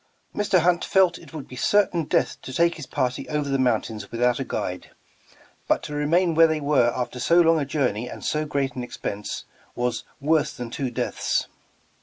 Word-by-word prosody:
Mr. 200 -4 +2
Hunt 175 +1 +2
felt 185 -3 +3
it - - -15
would 155 -4 -7
be 130 - -10
certain 180 +3 +2
death - - 0
to - - -8
take 170 +5 +3
his 155 -5 -9
party 125 -3 -2
over 150 -1 -1
the 135 -1 0
mountains 110 -4 0
without 120 +1 +1
a - - -1
guide, 90 -7 -4 0.8
but - - +2
to 150 - -6
re 145 0 -1
main 170 +2 +3
where 165 +1 +6
they 160 -1 -1
were 140 -5 +3
after 125 0 -3
so 170 +8 +4
long 165 -1 +5
a 145 - -1
journey 125 -5 -1
and - - -8
so 155 0 0
great 140 -3 -1
an 125 - -5
expense, 105 -4 -5 0.3
w^as 120 -1 -1 0.2
'Svorse 150 0 +1
than 120 -2 -6
two 135 0 -2
deaths." 120 - -1
145 Hz, 200 wpm, -24 LUFS, 125-165 Hz, 0.8 s, where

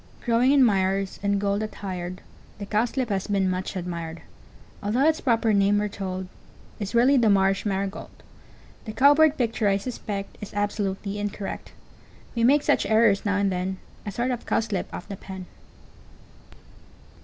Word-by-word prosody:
] - - -26
Growing 240 +2 +3
in 280 -2 +6
mires, 195 -3 +1
in 200 0 +1
gold 200 +1 0
attired, 185 -4 -5 0.4
The 200 - -6
Cowslip 230 +4 0
has 195 -2 -1
been 200 -2 +1
much 185 +1 -2
admired, 170 -2 -5 0.6
Altho' 225 +7 +1
its 315 0 +2
proper 230 -3 +2
name, 200 0 +3
we're 210 0 0
told, 190 -2 -5 0.5
Is 205 +2 -4
really 255 +4 +5
the 230 -3 +4
Marsh 195 0 +2
Marigold: 195 0 -3 0.8
The 215 - -6
Cow 280 +5 +6
Bird 315 0 +4
picture, 230 -3 0
I 195 -1 +3
suspect, 200 -2 -6
Is 205 0 -8
absolutely 205 -1 -2
incorrect, 205 -1 -5 0.6
We 230 - 0
make 280 +4 +5
such - - +2
errors 220 -2 +3
now 200 -1 +1
and 200 -1 +1
then, 185 +1 -2 0.3
A 205 - -5
sort 240 +6 -1
of 245 - -5
cow - - +2
slip 215 -4 -3
of - - -7
the 200 - -6
pen. 190 -1 -8
205 Hz, 165 wpm, -25 LUFS, 195-230 Hz, 0.8 s, in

